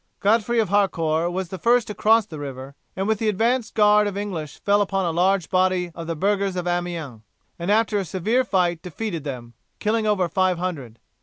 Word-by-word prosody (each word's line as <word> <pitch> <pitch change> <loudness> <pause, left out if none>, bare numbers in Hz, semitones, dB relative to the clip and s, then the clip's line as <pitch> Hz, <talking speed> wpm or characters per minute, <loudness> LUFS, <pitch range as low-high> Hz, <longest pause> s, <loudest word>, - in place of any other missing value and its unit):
Godfrey 225 +3 +2
of 220 -5 +2
Harcourt 170 -4 +1
was 185 -1 -3
the 190 - -7
first 240 +4 +3
to 210 - -6
cross 220 +1 +3
the 155 -6 -9
river, 135 -1 -7 0.2
and 195 +1 -2
with 220 -1 +1
the 220 - +1
advance 230 +3 +1
guard 210 -1 +4
of 200 -1 -4
English 175 -8 -5
fell 205 0 +3
upon 195 -1 0
a 170 - 0
large 180 +2 +1
body 185 -1 +1
of 165 -1 -8
the 165 - -2
burghers 195 +2 0
of 180 -1 -3
Amiens, 175 -9 -3 0.4
and 170 +3 -3
after 215 0 +2
a - - -1
severe 210 +8 0
fight 180 -6 0
defeated 180 -2 -5
them, 125 -5 -7 0.2
killing 215 +1 0
over 195 -4 +2
five 185 0 +1
hundred. 150 -11 -5
190 Hz, 205 wpm, -23 LUFS, 170-210 Hz, 0.4 s, guard